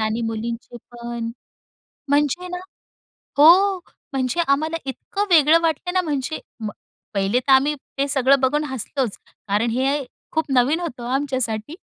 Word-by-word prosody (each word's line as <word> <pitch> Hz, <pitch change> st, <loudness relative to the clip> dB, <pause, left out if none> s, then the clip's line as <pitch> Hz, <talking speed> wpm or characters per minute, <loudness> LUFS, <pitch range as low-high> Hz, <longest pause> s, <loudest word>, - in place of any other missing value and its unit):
आणि 220 Hz, +1 st, 0 dB
मुलींचे 230 Hz, +1 st, -4 dB
पण. 235 Hz, -1 st, -5 dB, 0.8 s
म्हणजे 295 Hz, +5 st, +1 dB
ना, 360 Hz, -, -4 dB, 0.8 s
हो 370 Hz, +5 st, +7 dB, 0.3 s
म्हणजे 265 Hz, +5 st, 0 dB
आम्हाला 310 Hz, +4 st, +1 dB
इतकं 395 Hz, +9 st, -3 dB
वेगळं 320 Hz, -1 st, +6 dB
वाटलं 330 Hz, +2 st, -1 dB
ना 370 Hz, -, +3 dB
म्हणजे. 300 Hz, -1 st, -2 dB, 0.2 s
म 215 Hz, -, -3 dB, 0.4 s
पहिले 195 Hz, +4 st, +1 dB
तर 270 Hz, +2 st, 0 dB
आम्ही 285 Hz, +3 st, +4 dB, 0.2 s
ते 275 Hz, +1 st, +1 dB
सगळं 275 Hz, 0 st, +3 dB
बघून 295 Hz, +3 st, +2 dB
हसलोच 260 Hz, -2 st, -3 dB, 0.3 s
कारण 210 Hz, +4 st, +1 dB
हे 270 Hz, +4 st, 0 dB, 0.3 s
खूप 320 Hz, 0 st, 0 dB
नवीन 265 Hz, +6 st, +3 dB
होतं 250 Hz, -8 st, -5 dB
आमच्यासाठी 260 Hz, -2 st, -1 dB
275 Hz, 135 wpm, -22 LUFS, 240-315 Hz, 0.8 s, हो